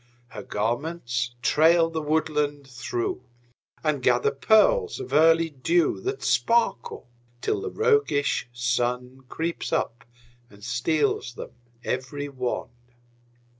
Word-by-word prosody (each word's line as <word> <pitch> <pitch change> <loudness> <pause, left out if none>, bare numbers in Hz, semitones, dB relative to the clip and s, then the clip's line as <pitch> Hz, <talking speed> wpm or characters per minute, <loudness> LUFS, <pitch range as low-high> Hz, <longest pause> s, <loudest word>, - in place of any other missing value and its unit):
Her 105 - -8
garments 120 +3 -2
trail 165 +4 +4
the 160 -1 -2
woodland 150 -2 -1
through, 365 - -3 0.6
And 150 -4 0
gather 125 -1 +3
pearls 420 - +3
of 395 - -7
early 165 +1 +4
dew 165 +4 +1
That 400 +2 -4
sparkle 230 - +1 0.3
till 405 - -1
the 425 - -3
roguish 430 - +1
Sun 125 +2 -2
Creeps 165 +1 -3
up 120 -7 -1 0.5
and 100 -1 -17
steals 125 +1 0
them - - -8 0.3
every 145 +3 -3
one. 130 -3 -3
145 Hz, 110 wpm, -25 LUFS, 125-170 Hz, 0.6 s, trail